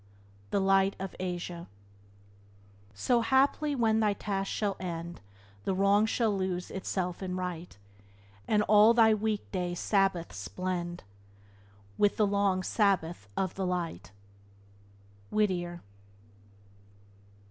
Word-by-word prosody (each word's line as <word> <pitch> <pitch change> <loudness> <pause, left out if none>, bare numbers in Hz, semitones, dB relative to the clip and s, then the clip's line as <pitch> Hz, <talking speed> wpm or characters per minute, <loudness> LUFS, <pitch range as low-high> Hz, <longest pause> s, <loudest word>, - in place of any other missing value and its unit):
— 100 0 -28
The 200 - +1
Light 195 0 +3
of 195 0 -6
Asia. 175 -1 -4 1.3
"So, 235 - +2
haply, 275 +5 +2
when 220 -3 +2
thy 210 -2 +2
task 195 -1 -3
shall 205 -2 -1
end, 170 -1 -5 0.4
The 190 - -1
wrong 200 +3 +3
shall 220 -2 +1
lose 185 -2 -3
itself 185 -2 -3
in 185 -1 -3
right, 180 - -5 0.7
And 210 -1 +3
all 215 +2 +6
thy 225 -2 +6
week 215 -1 -2
day 180 -2 -2
Sabbaths 175 - 0
blend 175 -1 -4 1.0
With 205 - +3
the 215 - +4
long 200 -2 +1
Sabbath 175 - 0
of 190 -2 0
the 195 - -3
Light!" 170 - -3 0.6
— 100 0 -28
Whittier. 175 -5 -1
190 Hz, 120 wpm, -30 LUFS, 175-205 Hz, 1.3 s, all